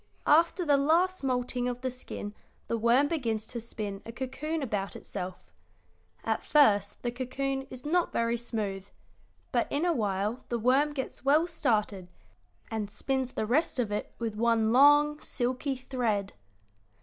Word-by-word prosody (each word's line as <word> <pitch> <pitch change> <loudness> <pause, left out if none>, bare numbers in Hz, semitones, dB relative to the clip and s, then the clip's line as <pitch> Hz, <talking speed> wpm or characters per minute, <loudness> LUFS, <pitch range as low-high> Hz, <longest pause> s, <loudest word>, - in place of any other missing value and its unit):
After 335 +4 +4
the 290 -2 +4
last 335 +5 +2
moulting 250 -1 -1
of 245 0 -3
the 260 0 -2
skin 225 -4 -7 0.3
the - - 0
worm 235 +5 +4
begins 230 -9 -1
to 235 - -5
spin 210 -3 -5
a 230 - -8
cocoon 285 +6 -3
about 205 -5 -2
itself. 185 -2 -7 0.7
At - - 0
first 205 -9 +3
the 240 - -1
cocoon 270 +2 -3
is 255 +2 -9
not 345 +3 +1
very 230 0 +1
smooth, 210 -5 -4 0.6
but 240 -3 0
in 295 +4 +1
a 345 - +3
while 210 -1 -1
the 240 - 0
worm 265 +6 +3
gets 265 -3 -5
well 295 +4 +4
started 215 - 0 0.6
and 215 -2 -2
spins 265 +3 -2
the - - -1
rest 270 +7 +1
of 235 -4 0
it 210 - -3
with 230 -2 -3
one 225 0 +2
long, 290 +3 +6
silky 255 +2 -1
thread." 240 -6 -2
250 Hz, 155 wpm, -29 LUFS, 220-280 Hz, 0.7 s, long